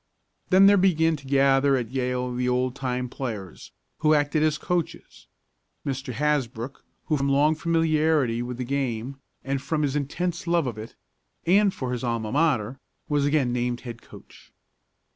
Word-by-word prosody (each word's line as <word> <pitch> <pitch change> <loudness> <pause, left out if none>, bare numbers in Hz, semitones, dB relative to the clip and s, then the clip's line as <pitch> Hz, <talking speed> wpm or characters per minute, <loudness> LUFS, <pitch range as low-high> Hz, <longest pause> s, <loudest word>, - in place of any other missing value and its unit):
Then 190 +1 +6
there 200 0 +7
began 165 -4 +3
to 135 -1 -14
gather 135 0 +4
at 120 -2 -4
Yale 125 -1 -2
the 125 0 -1
oldtime 125 0 -1
players, 110 -8 -7 0.3
who 155 0 +4
acted 145 +1 +1
as 155 -1 +2
coaches. 175 0 -4 0.6
Mr. 135 -1 -3
Hasbrook, 135 -3 -2 0.2
who 155 - +1
from 140 0 0
long 145 +3 +4
familiarity 155 -6 +1
with 120 0 -5
the 125 - -3
game, 130 -1 -3 0.3
and 135 0 -2
from 155 +1 -1
his 140 -1 0
intense 170 +5 -2
love 170 -2 +2
of 115 -4 -4
it, 110 - -9 0.5
and 200 +3 +4
for 130 -8 -5
his 125 -1 -3
alma 115 -3 -2
mater, 135 -5 +1 0.3
was 145 -1 +2
again 140 -5 +1
named 120 0 -1
as - - -21
head 120 -2 -8
coach. - - -16
135 Hz, 160 wpm, -25 LUFS, 125-155 Hz, 0.6 s, there